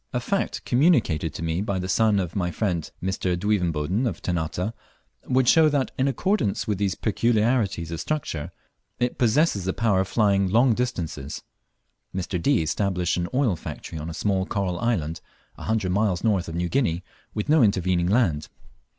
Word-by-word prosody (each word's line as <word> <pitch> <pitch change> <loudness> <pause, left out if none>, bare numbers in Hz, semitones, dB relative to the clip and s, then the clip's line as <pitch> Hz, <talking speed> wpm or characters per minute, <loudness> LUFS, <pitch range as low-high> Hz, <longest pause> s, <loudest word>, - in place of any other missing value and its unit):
A 125 - +1
fact 195 +10 -2
communicated 120 - +2
to - - -5
me 85 +2 -1
by 100 -2 -1
the 90 0 -3
son 105 +2 +3
of 90 -3 -3
my 90 -3 0
friend 90 -3 -2
Mr. 95 -1 -1
Duivenboden 90 - 0
of 95 -8 -4
Ternate, 90 +4 -2 0.5
would 130 -1 +2
show 160 +2 +6
that, 140 -3 0
in 130 - +1
accordance 140 - 0
with 105 -3 -1
these 100 -1 0
peculiarities 110 -5 +1
of 85 - -4
structure, 130 - -3 0.5
it 125 0 -1
possesses 120 - +2
the 95 - 0
power 110 -5 +2
of 95 - 0
flying 100 -1 +2
long 120 +5 +4
distances. 85 - -3 0.7
Mr. 90 -1 -2
D. 135 - +3
established 90 +1 0
an 90 0 -1
oil 125 -7 +2
factory 80 0 -7
on 80 +2 -5
a 80 - -6
small 95 +1 0
coral 95 -4 -2
island, 85 -9 -1 0.3
a - - -9
hundred 110 -4 0
miles 100 -2 +1
north 100 -6 +1
of 80 - -6
New 85 +1 0
Guinea, 90 -7 0 0.3
with 105 - -2
no 155 0 +5
intervening 90 -5 +2
land. 90 -8 +1
100 Hz, 175 wpm, -25 LUFS, 85-115 Hz, 0.7 s, show